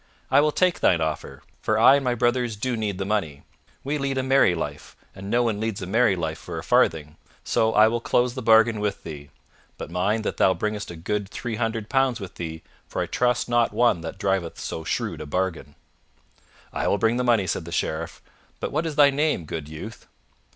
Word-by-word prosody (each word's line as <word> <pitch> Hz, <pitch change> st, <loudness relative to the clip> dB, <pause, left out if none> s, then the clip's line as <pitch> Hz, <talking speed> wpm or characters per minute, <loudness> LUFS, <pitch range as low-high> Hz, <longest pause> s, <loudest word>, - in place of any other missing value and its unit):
I -, -, +6 dB
will 150 Hz, 0 st, +2 dB
take 180 Hz, +2 st, +1 dB
thine 85 Hz, -, +3 dB
offer, 80 Hz, -1 st, -4 dB, 0.2 s
for -, -, +1 dB
I 135 Hz, -, +7 dB
and 140 Hz, -, -3 dB
my 125 Hz, -2 st, 0 dB
brothers 120 Hz, -1 st, 0 dB
do 125 Hz, +4 st, -2 dB
need 105 Hz, -4 st, -2 dB
the 95 Hz, -, -3 dB
money. 95 Hz, -9 st, -2 dB, 0.4 s
We 145 Hz, +2 st, -2 dB
lead 135 Hz, -1 st, -2 dB
a 130 Hz, -, 0 dB
merry 130 Hz, -9 st, +4 dB
life, 75 Hz, -3 st, -6 dB, 0.2 s
and 95 Hz, +1 st, -8 dB
no 120 Hz, +2 st, +2 dB
one 110 Hz, -3 st, -1 dB
leads 110 Hz, -2 st, -2 dB
a 90 Hz, -, -5 dB
merry 110 Hz, +1 st, +3 dB
life 80 Hz, -3 st, -3 dB
for -, -, -7 dB
a -, -, -5 dB
farthing, 75 Hz, -1 st, +1 dB, 0.3 s
so 110 Hz, 0 st, +1 dB
I 110 Hz, +1 st, +7 dB
will 115 Hz, +1 st, -1 dB
close 120 Hz, +1 st, +1 dB
the 130 Hz, -, -5 dB
bargain 110 Hz, 0 st, +5 dB
with 105 Hz, -1 st, -2 dB
thee. 75 Hz, -3 st, -8 dB, 0.5 s
But -, -, -7 dB
mind 100 Hz, +5 st, 0 dB
that -, -, -3 dB
thou 95 Hz, -, +4 dB
bringest 105 Hz, +3 st, -3 dB
a 85 Hz, -, -7 dB
good 100 Hz, +4 st, -3 dB
three 120 Hz, 0 st, -5 dB
hundred 115 Hz, -2 st, -2 dB
pounds 135 Hz, -2 st, +1 dB
with 95 Hz, -3 st, -8 dB
thee, 80 Hz, -1 st, -6 dB, 0.2 s
for -, -, -5 dB
I -, -, 0 dB
trust 125 Hz, -1 st, 0 dB
not 120 Hz, -1 st, +2 dB
one 120 Hz, -8 st, +2 dB
that 80 Hz, +3 st, -6 dB
driveth 95 Hz, -4 st, -1 dB
so 80 Hz, -, -5 dB
shrewd -, -, -3 dB
a -, -, -7 dB
bargain." 85 Hz, -3 st, -3 dB, 1.0 s
"I -, -, -1 dB
will -, -, +2 dB
bring 115 Hz, +4 st, +1 dB
the 125 Hz, -, 0 dB
money," 115 Hz, -5 st, +3 dB
said 85 Hz, -, -2 dB
the 85 Hz, -, -8 dB
Sheriff. 85 Hz, 0 st, -3 dB, 0.4 s
"But -, -, -3 dB
what 155 Hz, +3 st, -1 dB
is 155 Hz, -, -4 dB
thy 145 Hz, -1 st, +6 dB
name, 145 Hz, -, 0 dB
good 75 Hz, -1 st, -6 dB
youth?" 80 Hz, +9 st, -9 dB
105 Hz, 220 wpm, -24 LUFS, 85-120 Hz, 1.0 s, I